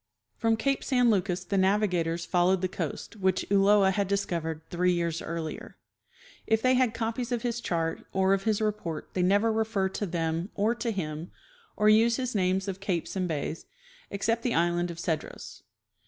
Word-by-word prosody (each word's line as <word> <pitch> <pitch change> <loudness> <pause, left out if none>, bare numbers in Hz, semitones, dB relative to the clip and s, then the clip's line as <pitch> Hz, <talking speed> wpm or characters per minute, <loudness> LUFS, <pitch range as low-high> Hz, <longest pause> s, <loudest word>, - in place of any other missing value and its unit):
From 225 -1 +1
cape 275 +4 0
San 250 -3 +3
Lucas 185 -3 0
the 195 +2 0
navigators 180 -4 +1
followed 180 +1 +2
the 185 - +1
coast, 175 +4 -5
which 190 -2 +1
Ulloa 200 0 +5
had 200 0 0
discovered 170 -5 -2
three 180 +1 +2
years 170 -1 -1
earlier. 165 -1 -6 0.7
If 220 0 +2
they 255 0 +4
had 250 -3 +2
copies 230 +2 -2
of 240 -2 -1
his 240 -1 -2
chart 165 -4 -2
or 190 0 +2
of 195 +1 -1
his 220 -1 +1
report 210 -7 -3
they 185 - 0
never 205 +5 +3
refer 220 -3 0
to 205 +2 -3
them 165 +1 -2
or 215 +3 +2
to 240 0 -3
him 160 -4 -4 0.5
or 210 - +3
use 225 +2 +5
his 255 -1 -2
names 190 -1 +1
of 195 -1 -4
capes 190 -4 -2
and 185 -1 0
bays, 155 0 -4 0.4
except 225 +4 -1
the 240 -1 -1
island 175 +1 +1
of 170 - -7
Cedros. 165 -2 -4
195 Hz, 180 wpm, -28 LUFS, 175-220 Hz, 0.7 s, Ulloa